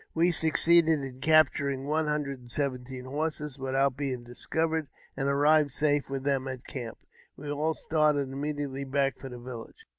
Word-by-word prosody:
We 170 Hz, +2 st, +4 dB
succeeded 165 Hz, 0 st, +4 dB
in 130 Hz, -1 st, -7 dB
capturing 140 Hz, -3 st, +3 dB
one 155 Hz, +2 st, 0 dB
hundred 145 Hz, -3 st, -2 dB
and 120 Hz, -1 st, -16 dB
seventeen 130 Hz, -2 st, -3 dB
horses 150 Hz, 0 st, -3 dB
without 135 Hz, 0 st, +1 dB
being 135 Hz, -3 st, -3 dB
discovered, 160 Hz, +6 st, -2 dB, 0.3 s
and 135 Hz, 0 st, -1 dB
arrived 145 Hz, +2 st, +4 dB
safe 145 Hz, +1 st, +1 dB
with 135 Hz, -1 st, -3 dB
them 135 Hz, -1 st, 0 dB
at 130 Hz, -1 st, -6 dB
the -, -, -10 dB
camp. 120 Hz, -5 st, -5 dB, 0.4 s
We 145 Hz, +1 st, -6 dB
all 155 Hz, +2 st, 0 dB
started 155 Hz, -3 st, +2 dB
immediately 140 Hz, -1 st, -3 dB
back 135 Hz, 0 st, 0 dB
for 135 Hz, -, -7 dB
the 125 Hz, -, -8 dB
village. 120 Hz, -1 st, -9 dB
140 Hz, 170 wpm, -28 LUFS, 130-150 Hz, 0.4 s, We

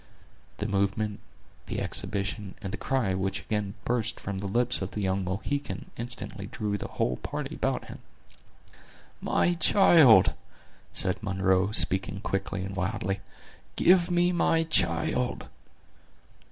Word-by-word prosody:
The 105 Hz, -, -3 dB
movement, 100 Hz, +1 st, -1 dB, 0.5 s
the -, -, -3 dB
exhibition, 100 Hz, -1 st, -4 dB
and 95 Hz, -2 st, -6 dB
the -, -, -3 dB
cry 120 Hz, -4 st, 0 dB
which 95 Hz, +1 st, -2 dB
again 105 Hz, -2 st, -3 dB
burst 115 Hz, -2 st, -1 dB
from 100 Hz, -1 st, -5 dB
the 100 Hz, -, -3 dB
lips 120 Hz, +4 st, 0 dB
of 95 Hz, -, -3 dB
the 105 Hz, -, -5 dB
young 95 Hz, 0 st, 0 dB
Mohican, 100 Hz, +3 st, -4 dB
instantly 120 Hz, -4 st, -7 dB
drew 110 Hz, -3 st, -3 dB
the 100 Hz, -, -4 dB
whole 60 Hz, 0 st, -2 dB
party -, -, -5 dB
about -, -, -2 dB
him. -, -, -10 dB, 1.2 s
"My 175 Hz, -, +1 dB
child!" 160 Hz, -, +6 dB, 0.6 s
said 95 Hz, +2 st, -1 dB
Munro, 95 Hz, -1 st, +1 dB
speaking 95 Hz, -2 st, +5 dB
quickly 95 Hz, -2 st, -3 dB
and 95 Hz, +1 st, -6 dB
wildly; 95 Hz, 0 st, -2 dB, 0.6 s
"give 180 Hz, -1 st, +4 dB
me 175 Hz, 0 st, +2 dB
my 165 Hz, -2 st, +2 dB
child!" 155 Hz, -4 st, 0 dB
100 Hz, 130 wpm, -27 LUFS, 95-125 Hz, 1.2 s, child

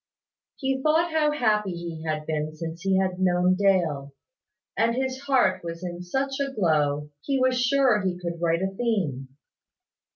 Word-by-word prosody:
He 265 Hz, -1 st, -1 dB
thought 320 Hz, +3 st, +2 dB
how 310 Hz, -1 st, +2 dB
happy 210 Hz, -9 st, +1 dB
he 170 Hz, -2 st, -6 dB
had 155 Hz, -1 st, -2 dB
been 155 Hz, 0 st, -3 dB
since 165 Hz, +1 st, -6 dB
he 190 Hz, -1 st, +2 dB
had 185 Hz, -1 st, 0 dB
known 180 Hz, 0 st, +3 dB
Dale, 170 Hz, -8 st, +1 dB, 0.6 s
and 230 Hz, +1 st, +2 dB
his 260 Hz, 0 st, -2 dB
heart 255 Hz, -10 st, +2 dB
was 170 Hz, +1 st, -6 dB
in 175 Hz, -1 st, -5 dB
such 270 Hz, +9 st, -2 dB
a 275 Hz, -1 st, -1 dB
glow, 150 Hz, -, +1 dB
he 275 Hz, -, -1 dB
was 255 Hz, -1 st, +2 dB
sure 255 Hz, -4 st, +3 dB
he 185 Hz, -2 st, -1 dB
could 170 Hz, -1 st, -5 dB
write 170 Hz, +1 st, +1 dB
a 190 Hz, -, -1 dB
theme. 185 Hz, -, -1 dB
185 Hz, 165 wpm, -25 LUFS, 165-260 Hz, 0.6 s, known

